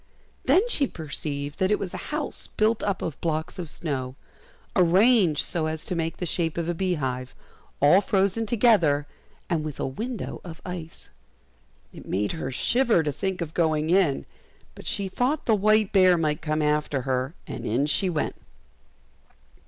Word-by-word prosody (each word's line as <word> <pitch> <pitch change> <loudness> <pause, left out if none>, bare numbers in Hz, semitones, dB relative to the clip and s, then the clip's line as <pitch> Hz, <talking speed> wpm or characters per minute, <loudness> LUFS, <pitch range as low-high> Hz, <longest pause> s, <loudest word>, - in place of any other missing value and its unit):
Then 365 - +4
she 290 - +2
perceived 145 -2 -5
that 190 -1 +2
it 210 - +3
was 185 - -5
a - - -4
house 300 -1 -2
built 220 +1 +2
up 200 -2 -1
of 160 -5 -5
blocks 160 +1 -2
of 170 -3 -4
snow, 130 -6 -3 0.6
arranged 185 -1 +4
so 160 -2 -1
as 155 0 -4
to - - -2
make 165 0 -2
the 180 - -3
shape 165 -1 -1
of 170 -1 -1
a 175 - 0
beehive, 140 -9 -2 0.4
all 150 +8 +6
frozen 200 +3 +1
together, 205 -11 +3 0.4
and 165 -3 0
with 155 -2 -6
a - - -1
window 220 - -5
of 165 -3 -9
ice. 175 -3 -7 0.8
It - - -12
made 100 +2 0
her 160 -5 -4
shiver 230 - +2
to 150 - -1
think 190 +5 -3
of 160 -2 -4
going 160 -1 +1
in, 180 -7 +2 0.5
but - - -10
she 200 -1 -1
thought 255 +10 -1
the 225 - +3
white 215 0 +3
bear 185 -3 +6
might 150 -2 0
come 155 -1 -1
after 150 -3 0
her, 130 +3 -1
and 120 - -6
in 120 +5 +1
she 185 +6 +2
went. 155 -3 -1
170 Hz, 170 wpm, -25 LUFS, 150-200 Hz, 0.8 s, all